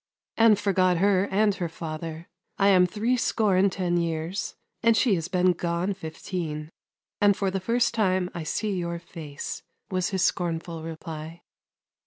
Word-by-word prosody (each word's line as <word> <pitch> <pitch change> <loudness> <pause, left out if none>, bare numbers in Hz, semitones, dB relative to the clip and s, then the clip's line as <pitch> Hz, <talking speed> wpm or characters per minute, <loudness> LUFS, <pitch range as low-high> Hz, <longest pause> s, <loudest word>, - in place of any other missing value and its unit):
" - - -68
And 225 -2 +6
forgot 185 -3 +2
her 195 +1 +3
and 205 +1 +3
her 175 -3 -3
father. 160 +1 -6 0.3
I 200 0 +4
am 180 -2 +6
three 220 +6 0
score 215 -5 +2
and 190 +1 +4
ten 180 -2 0
years, 170 +2 -2 0.3
and 230 -1 +4
she 225 0 +4
has 165 -3 -1
been 180 0 +3
gone 170 +3 -1
fifteen, 160 -3 -5 0.5
and 205 -1 +5
for 195 -2 0
the 195 - -1
first 230 +5 +1
time 185 -4 +2
I 170 - -4
see 200 +6 -2
your 170 -1 -2
face," 165 -4 -7 0.3
was 185 0 0
his 190 -2 0
scornful 165 -2 -1
reply. 160 0 -7
180 Hz, 165 wpm, -26 LUFS, 165-200 Hz, 0.5 s, And